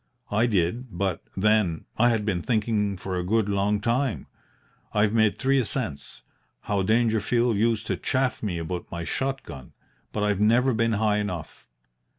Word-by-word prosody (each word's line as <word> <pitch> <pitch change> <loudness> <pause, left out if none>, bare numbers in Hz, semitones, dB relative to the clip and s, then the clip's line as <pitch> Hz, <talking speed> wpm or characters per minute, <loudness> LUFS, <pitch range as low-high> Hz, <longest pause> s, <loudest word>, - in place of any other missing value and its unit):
I 110 +3 +3
did 105 +2 -1
but, 95 -3 -1 0.2
then, 105 -5 +2
I 120 +2 +4
had 110 -3 0
been 95 -5 0
thinking 105 -3 0
for 95 0 -4
a 90 - -1
good 110 +3 +1
long 100 +1 +1
time. 120 +3 0 0.7
I've 105 0 +2
made 110 -2 +3
three 135 +1 +2
ascents 110 - -4 0.4
how 100 -1 -1
Dangerfield 115 +2 +2
used 115 +1 +1
to 95 - -2
chaff 130 +6 0
me 100 -6 -2
about 85 +2 -5
my 85 0 -5
shot 135 +9 -2
gun! 70 -6 -10 0.4
but 105 - -2
I've 105 -2 +1
never 120 +5 +4
been 115 0 +1
high 105 0 +2
enough. 95 -6 -5
105 Hz, 160 wpm, -25 LUFS, 95-115 Hz, 0.7 s, I